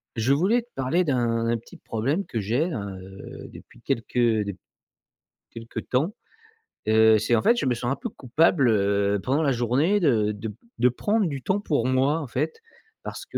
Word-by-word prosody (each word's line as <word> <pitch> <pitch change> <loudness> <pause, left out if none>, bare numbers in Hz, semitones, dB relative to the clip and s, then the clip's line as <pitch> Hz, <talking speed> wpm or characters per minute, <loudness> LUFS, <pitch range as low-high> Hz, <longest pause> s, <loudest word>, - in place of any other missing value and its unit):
Je 115 +4 +2
voulais 200 +11 +2
te 240 - -28
parler 135 +8 +1
d'un 120 -5 0
un 120 0 +1
petit 115 - -15
problème 140 - -2
que 115 - -4
j'ai 120 - 0
là, 150 - -3 0.2
heu, 95 +1 -10
depuis - - -15
quelques 115 - -3
de 110 -5 +2 1.0
quelque 115 0 -7
temps. 150 +11 -1 0.7
Heu, 110 0 +6
c'est 110 +3 +1
en 110 - +2
fait, 235 - +4
je - - -1
me 130 - +2
sens 120 +1 -2
un - - +1
peu - - -5
coupable, 135 +1 +2
heu, 100 -1 +2
pendant 135 +4 +1
la 145 -3 +2
journée 130 - +2
de 115 - +2
de 105 +2 -6
p 105 - -10 0.2
de 125 - +4
prendre 205 - 0
du 140 -4 -4
temps 190 +10 0
pour 145 - 0
moi 135 +4 +2
en 150 - -5
fait, 460 - -2 0.4
parce - - -7
que, - - -5
125 Hz, 195 wpm, -25 LUFS, 110-155 Hz, 1.0 s, Heu